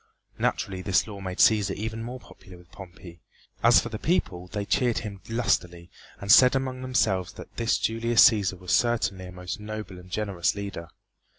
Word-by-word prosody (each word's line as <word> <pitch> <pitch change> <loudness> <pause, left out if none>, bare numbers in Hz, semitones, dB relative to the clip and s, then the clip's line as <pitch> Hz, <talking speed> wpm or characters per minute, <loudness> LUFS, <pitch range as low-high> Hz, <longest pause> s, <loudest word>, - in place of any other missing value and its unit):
Naturally 95 -1 -1
this 95 0 +1
law 100 -3 -9
made 95 0 -5
Cæsar 105 -3 +4
even 110 +2 -5
more 125 +2 -7
popular 95 -6 -15
with 90 0 -20
Pompey, 90 -3 -12 0.4
as 120 0 +6
for 120 - -4
the 110 -2 -6
people 90 - -1
they 100 +2 -4
cheered 120 +2 +1
him 100 -2 -8
lustily 90 -7 -1 0.3
and 100 +1 0
said 125 +2 +7
among 130 -1 -2
themselves 95 -8 0
that - - -12
this 115 0 +1
Julius 115 +1 +4
Cæsar 100 -4 0
was 90 0 -6
certainly 110 -6 +1
a - - -10
most 90 +3 -6
noble 105 -3 -7
and 90 0 -15
generous 95 -3 -1
leader. 100 -4 -6
100 Hz, 180 wpm, -26 LUFS, 90-115 Hz, 0.4 s, said